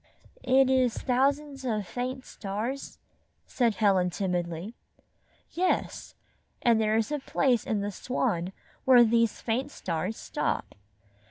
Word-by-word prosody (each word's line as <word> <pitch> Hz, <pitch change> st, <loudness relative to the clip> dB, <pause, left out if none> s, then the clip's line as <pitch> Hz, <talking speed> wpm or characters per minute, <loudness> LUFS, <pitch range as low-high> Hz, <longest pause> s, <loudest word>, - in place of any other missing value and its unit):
"It 260 Hz, +1 st, +4 dB
is 255 Hz, -3 st, +2 dB
thousands 275 Hz, +2 st, 0 dB
of 215 Hz, -5 st, -1 dB
faint 255 Hz, +5 st, -4 dB
stars," 220 Hz, +7 st, -5 dB, 0.5 s
said 235 Hz, -5 st, +1 dB
Helen, 190 Hz, -3 st, +3 dB
timidly. 175 Hz, +1 st, -3 dB, 0.8 s
"Yes, 365 Hz, +1 st, -1 dB, 0.5 s
and 230 Hz, -2 st, +4 dB
there 215 Hz, 0 st, +2 dB
is 225 Hz, +5 st, 0 dB
a 295 Hz, -, -1 dB
place 260 Hz, -3 st, +1 dB
in 210 Hz, -2 st, 0 dB
the 205 Hz, +1 st, -2 dB
Swan 195 Hz, -5 st, -1 dB, 0.3 s
where 250 Hz, -2 st, +7 dB
these 230 Hz, -1 st, +2 dB
faint 245 Hz, +5 st, -1 dB
stars 185 Hz, -, -3 dB
stop. -, -, -3 dB
230 Hz, 120 wpm, -28 LUFS, 205-260 Hz, 0.8 s, where